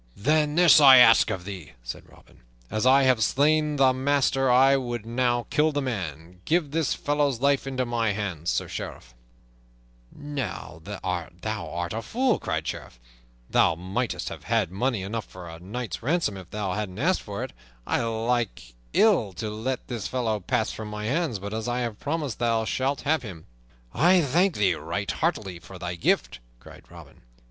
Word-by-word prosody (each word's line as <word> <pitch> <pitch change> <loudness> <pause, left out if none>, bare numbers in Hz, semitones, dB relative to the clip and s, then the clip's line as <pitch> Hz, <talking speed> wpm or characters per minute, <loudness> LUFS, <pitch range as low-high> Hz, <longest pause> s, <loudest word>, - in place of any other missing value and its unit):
"Then 150 +6 +2
this 170 -3 +7
I 135 -2 +10
ask 120 -2 +7
of 90 -2 -4
thee," 90 -11 -8
said - - -8
Robin. - - -20 0.3
"As 110 +4 +1
I 135 +1 +6
have 130 -4 +3
slain 150 +5 +2
the 135 -2 +4
master 135 0 +1
I 135 +2 +6
would 120 -4 -3
now 120 0 0
kill 155 +1 +3
the 145 - -1
man. 90 - -5
Give 160 -3 0
this 160 -2 0
fellow's 145 -4 0
life 140 +1 +2
into 130 -1 -1
my 115 -2 0
hands, 90 -5 -3
Sir - - -1
Sheriff." - - -7 1.0
"Now 145 -3 -6
thou - - -4
art 85 +3 -4
a 115 - -3
fool!" 245 - 0
cried 80 -1 -2
the - - -4
Sheriff. - - -8 0.5
"Thou 80 - +3
mightst 95 +8 -3
have - - -9
had 110 -7 +1
money 110 +1 -1
enough 110 +2 -4
for 90 -1 -11
a 80 0 -9
knight's 110 +7 -5
ransom 145 - 0
if 95 -3 -10
thou 100 -3 -3
hadst 100 -2 -4
asked 175 +10 +1
for 100 -1 -5
it. - - -7 0.3
I - - 0
like 115 - -2 0.2
ill 180 - +3
to 105 +4 -4
let 120 +4 -4
this 115 -5 -4
fellow 115 -4 -1
pass 110 +3 -1
from 110 - -7
my 105 0 -5
hands, 140 -1 0
but 100 +2 -7
as 110 +1 -3
I 120 +1 -1
have 115 -4 -4
promised, 145 -4 -3
thou 115 -2 +1
shalt 135 +5 -1
have 155 0 +1
him." 95 -9 -9 0.5
"I 180 +4 +5
thank 170 +6 +2
thee 100 -4 +2
right 85 +6 -3
heartily 100 - -2
for 95 +2 -12
thy 90 -1 -4
gift," 85 -7 0 0.2
cried - - -15
Robin. - - -14
120 Hz, 180 wpm, -26 LUFS, 100-140 Hz, 1.0 s, I